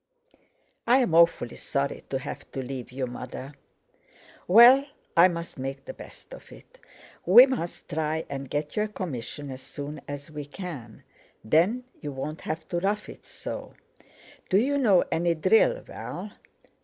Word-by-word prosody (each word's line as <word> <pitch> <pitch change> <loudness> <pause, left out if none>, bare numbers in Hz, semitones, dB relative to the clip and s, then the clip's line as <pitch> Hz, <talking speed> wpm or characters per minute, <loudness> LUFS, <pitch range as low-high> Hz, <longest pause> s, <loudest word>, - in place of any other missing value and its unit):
"I'm 245 -7 +4
awfully 165 -8 +4
sorry 140 0 -2
to 135 - -1
have 135 +2 -8
to 135 - -3
leave 125 -1 -6
you, 130 +1 -2
Mother." 125 +3 -7 0.9
"Well, 240 +8 +8 0.3
I 170 +2 +8
must 170 -5 -6
make 135 +1 -5
the - - -7
best - - -13
of - - -13
it. - - -16 0.4
We 235 +8 +9
must 250 -11 -4
try 160 +1 -2
and 135 -1 -6
get 150 0 -3
you 210 - +1
a 215 - 0
commission 145 - -6
as 130 0 -8
soon 145 +1 -7
as 145 +2 -7
we 150 -1 -6
can; 145 - -8 0.4
then 180 - +2 0.2
you 145 - -4
won't 150 +4 -5
have 160 +1 -5
to 175 - -1
rough 205 +3 -1
it - - -12
so. - - -7 0.7
Do 190 - +4
you 280 +6 +2
know 205 -9 +5
any 170 +1 +1
drill, - - +3
Val?" - - -7
160 Hz, 155 wpm, -26 LUFS, 140-210 Hz, 0.9 s, We